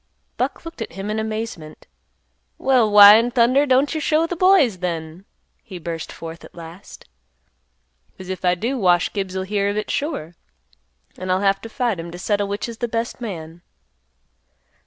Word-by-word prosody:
Buck - - -3
looked 330 -7 -9
at - - -5
him 195 +2 -5
in 215 - -2
amazement. 220 -8 -5 0.7
"Well, 255 -5 +3
why 205 0 +10
in 230 +2 +1
thunder 255 +4 +3
don't 265 +3 +3
you 315 - -2
show 310 +2 +2
th' 350 - -4
boys, 365 - +4
then?" 170 0 -5 0.4
he 190 - -10
burst 165 -1 -6
forth 165 0 -9
at - - -14
last. 170 +2 -12 1.1
"'Cause 185 - -10
if 190 0 -5
I 180 0 +3
do 245 +8 -2
Wash 180 -3 +2
Gibbs'll 190 -2 -3
hear 200 0 0
of 205 - -3
it 210 - -3
sure, 280 - -3 0.9
and 185 0 -3
I'll 185 +1 +1
have 195 -1 +2
to 225 - -9
fight 235 -6 -1
him 165 +1 -6
to 175 - -9
settle 205 +2 -1
which 200 +3 -3
is 230 -1 -8
th' 240 0 -3
best 230 +2 -3
man." 170 -6 -7
205 Hz, 180 wpm, -21 LUFS, 180-235 Hz, 1.1 s, why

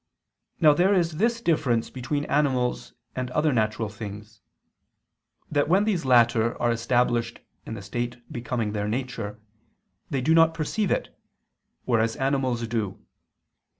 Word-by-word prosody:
Now 155 -3 +6
there 185 +6 +3
is 170 -4 0
this 230 +4 +1
difference 130 - +1
between 145 +3 -3
animals 125 - 0 0.2
and 130 -1 -3
other 150 +3 +1
natural 110 -1 0
things, 105 0 -9 1.1
that 145 0 +1
when 190 +4 +4
these 195 -8 0
latter 120 -2 +3
are 120 - +2
established 120 0 0 0.3
in 110 - -5
the 100 - -8
state 120 +4 -3 0.2
becoming 120 -2 -2
their 105 -1 -2
nature, 110 -3 -4 0.7
they 135 - -1
do 155 +6 +3
not 165 0 +5
perceive 185 +6 -1
it, - - -2 0.7
whereas 115 -2 +1
animals 130 -4 0
do. 110 -4 -3
125 Hz, 135 wpm, -25 LUFS, 115-150 Hz, 1.1 s, Now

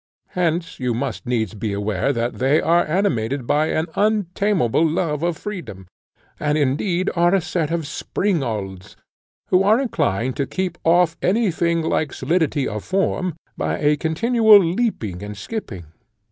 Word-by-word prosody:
Hence 170 -1 -1
you 125 -3 -1
must 130 0 -4
needs 110 -5 -1
be 105 -1 -3
aware 100 +4 -1
that 120 -2 -2
they 135 +4 +3
are 170 +1 +3
animated 140 - 0
by 150 +5 +2
an 160 - 0
untameable 200 - +1
love 155 -2 0
of 170 -1 -1
freedom, 175 - -7 0.5
and 150 0 0
indeed 170 +7 0
are 175 +2 +3
a - - +3
set 165 -2 -2
of 165 -2 -2
springalds, 115 - -3 0.5
who 185 - +4
are 210 +4 +4
inclined 130 - -1
to 140 -2 -1
keep 185 -2 -3
off 170 0 +3
any 210 +1 +2
thing 170 0 0
like 155 -2 -1
solidity 160 -5 0
of 105 0 -4
form 185 -2 -1 0.2
by - - -2
a 150 0 +2
continual 220 - +4
leaping 170 - -1
and 105 0 -7
skipping. 100 - -6
160 Hz, 150 wpm, -21 LUFS, 125-185 Hz, 0.5 s, who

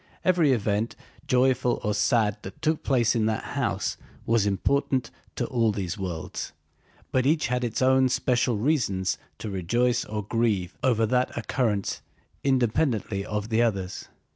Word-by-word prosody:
Every 170 -6 +4
event, 110 -1 0 0.3
joyful 125 -1 +2
or 105 - 0
sad, 105 -1 +2
that 95 -2 -9
took 155 0 0
place 120 -4 +2
in 110 -3 +1
that 110 -1 -1
house - - -1 0.3
was 115 -3 +2
important 130 +6 0 0.2
to - - -1
all 115 -3 +1
these 95 -4 -3
worlds, 90 -5 -5 0.6
but 130 0 +2
each 155 -1 +2
had 125 0 0
its 120 +1 -1
own 130 0 +4
special 125 -2 +1
reasons 100 - 0 0.2
to 105 - -5
rejoice 120 +7 +1
or 105 -1 -4
grieve 105 -4 0
over 115 -4 +3
that 125 +3 0
occurrence 110 -4 -1 0.4
independently 120 -5 +1
of 105 +1 -3
the 115 0 +2
others. 100 -6 -1
115 Hz, 145 wpm, -26 LUFS, 105-130 Hz, 0.6 s, Every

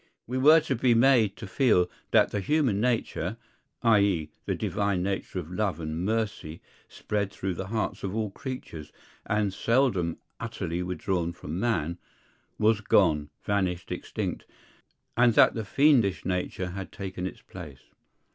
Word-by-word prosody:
We 130 +2 -2
were 155 +5 +8
to 140 - -1
be 120 0 +3
made 115 -4 +4
to - - -8
feel 95 -2 +3 0.2
that - - +4
the 105 - -1
human 125 0 +1
nature, 115 -5 -1 0.5
i.e., 100 -9 +3 0.2
the - - 0
divine 100 -3 -1
nature 95 0 -3
of 90 -2 -5
love 95 -3 -1
and 80 +1 -3
mercy, 105 -7 -2 0.3
spread 100 -2 -2
through 95 -1 -3
the 95 +2 -5
hearts 110 +1 -2
of 100 +1 -3
all 110 -3 -1
creatures, 95 - -7 0.4
and 105 -2 +1
seldom 110 -7 +1 0.2
utterly 90 -7 -3
withdrawn 90 -1 -2
from 85 0 -6
man, 85 -7 -1 0.6
was 110 0 +3
gone, 80 -8 +3
vanished, 95 -4 -1
extinct; - - -4 0.7
and 120 -1 +4
that - - +6
the 110 - -3
fiendish 120 -3 +3
nature 90 0 -2
had 95 +1 -6
taken 95 -2 -5
its - - -10
place. 75 -8 -10
100 Hz, 145 wpm, -27 LUFS, 90-115 Hz, 0.7 s, were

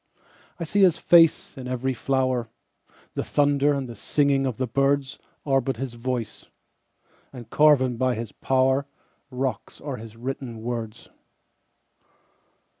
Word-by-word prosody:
I - - -3
see 200 +5 0
his 180 -4 +5
face 165 -2 +4
in 125 - -7
every 130 +1 -1
flower; 130 -2 -1 0.6
The - - -2
thunder 145 0 +2
and 135 -2 -3
the 120 - -8
singing 140 +4 +1
of 125 -4 -4
the 130 - -1
birdsAre 135 +1 -1
but 130 -2 -2
his 130 -1 -4
voice—and 120 0 -9
carven 135 -5 +4
by 130 0 +1
his 115 -2 -5
powerRocks 130 -2 -2
are 140 -3 -5
his 115 -1 -11
written 120 -2 -6
words. 115 -2 -5
130 Hz, 120 wpm, -24 LUFS, 120-140 Hz, 0.6 s, his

